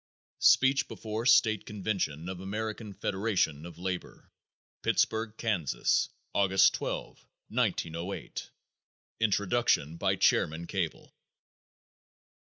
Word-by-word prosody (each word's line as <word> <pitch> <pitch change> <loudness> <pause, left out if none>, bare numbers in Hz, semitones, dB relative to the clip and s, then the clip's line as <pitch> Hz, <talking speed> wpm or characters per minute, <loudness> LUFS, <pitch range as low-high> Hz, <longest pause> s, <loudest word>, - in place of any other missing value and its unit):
Speech 135 +1 +5
Before 110 +2 -4
State 110 -5 +4
Convention 95 -6 -2
of 95 -1 -5
American 105 +2 -4
Federation 95 -7 -1
of 85 - -12
Labor, 90 0 -5 0.5
Pittsburg, 110 0 +1
Kansas, 95 - +1 0.2
August 95 -1 +4
12, - - -5 0.3
1908. 85 +4 -2 0.7
Introduction 105 -7 +1
by - - +1
Chairman 80 +2 +2
Cable. 90 -3 -4
95 Hz, 85 wpm, -30 LUFS, 85-110 Hz, 0.7 s, Speech